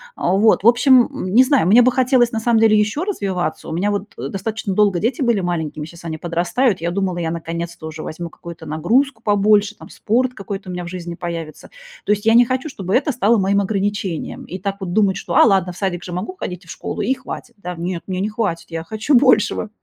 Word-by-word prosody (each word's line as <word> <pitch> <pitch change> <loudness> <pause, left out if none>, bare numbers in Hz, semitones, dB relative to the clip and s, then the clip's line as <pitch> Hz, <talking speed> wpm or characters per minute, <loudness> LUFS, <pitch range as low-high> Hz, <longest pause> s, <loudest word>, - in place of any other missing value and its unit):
Вот, 195 +5 +2
в - - +4
общем, 250 +1 +5 0.2
не 255 +4 +7
знаю, 265 - +2
мне 225 +6 +7
бы 255 - +4
хотелось 250 -1 +3
на 225 - -2
самом 225 0 +2
деле 220 -1 +5
ещё 215 +11 0
развиваться. 195 - -3
У - - -4
меня 195 +5 0
вот, 205 0 -4
э, 135 +3 -5
достаточно 205 +2 -3
долго 200 -3 +2
дети 235 - -1
были 235 -5 +2
маленькими, 160 -4 -3
щас 170 +1 -13
они 160 -1 -4
подрастают. 175 - 0
Я 170 - -1
думала, 185 -1 -1
я 165 -2 -2
наконец-то 170 0 -5
уже 160 0 -7
возьму 170 +2 -6
какую-то 170 0 -11
нагрузку 220 - 0
побольше, 205 0 +3
там - - -13
спорт 250 +4 0
какой-то 195 -3 -7
у - - -4
меня 180 0 -5
в - - -7
жизни 175 -1 -6
появится. 165 -3 -6 0.4
То - - +1
есть 205 +1 0
я 225 - +5
не 240 +1 +7
хочу, 255 +5 -2
чтобы 195 -7 -3
это 290 +3 +2
стало 235 -2 +2
моим 200 +1 +2
ограничением, 200 -4 -3
и 185 - -7
так 195 +1 -3
вот 175 -2 -4
думать, 200 -3 +3
что: - - -5
"А - - +7
ладно, 190 -4 +2
в - - -14
садик 175 -3 -2
же 180 - -8
могу 185 - -4
ходить 180 0 -6
и - - -22
в - - -8
школу, - - -5
и 265 - +1
хватит". 255 -2 -9
Да 180 -3 -6
нет, 170 +1 -4
мне 185 -1 -3
не 210 - -1
хватит, 210 -6 -3
я 165 0 -4
хочу 220 - 0
большего. 235 -4 +3
200 Hz, 235 wpm, -19 LUFS, 175-230 Hz, 0.4 s, не